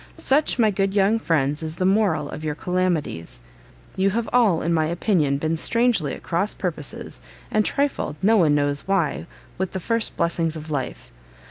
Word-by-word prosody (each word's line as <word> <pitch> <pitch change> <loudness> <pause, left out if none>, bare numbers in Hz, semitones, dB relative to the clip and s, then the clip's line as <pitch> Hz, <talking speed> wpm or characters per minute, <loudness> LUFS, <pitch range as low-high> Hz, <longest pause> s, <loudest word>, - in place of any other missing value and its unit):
"Such, 285 +2 +2
my 220 -3 +4
good 195 0 -1
young 205 +3 +3
friends, 150 -6 0
is 160 0 -4
the 185 - -1
MORAL 190 -6 +2
of 155 - -7
your 150 -1 -2
calamities. 170 - -2 0.5
You 190 +1 +2
have 230 +3 -1
all, 220 -9 +3
in 170 +1 +1
my 160 -1 +2
opinion, 165 -5 +1
been 160 +3 -1
strangely 230 - +1
at - - -13
cross 195 +5 -1
purposes, 160 -6 -4 0.3
and 215 - +3
trifled, 280 - -1
no 215 +4 +4
one 160 -8 +4
knows 145 +1 0
why, 170 - 0 0.3
with 190 -1 -2
the 190 - -2
first 230 +4 -1
blessings 165 -1 0
of 155 0 -8
life. 135 -4 -4
175 Hz, 175 wpm, -23 LUFS, 155-205 Hz, 0.5 s, my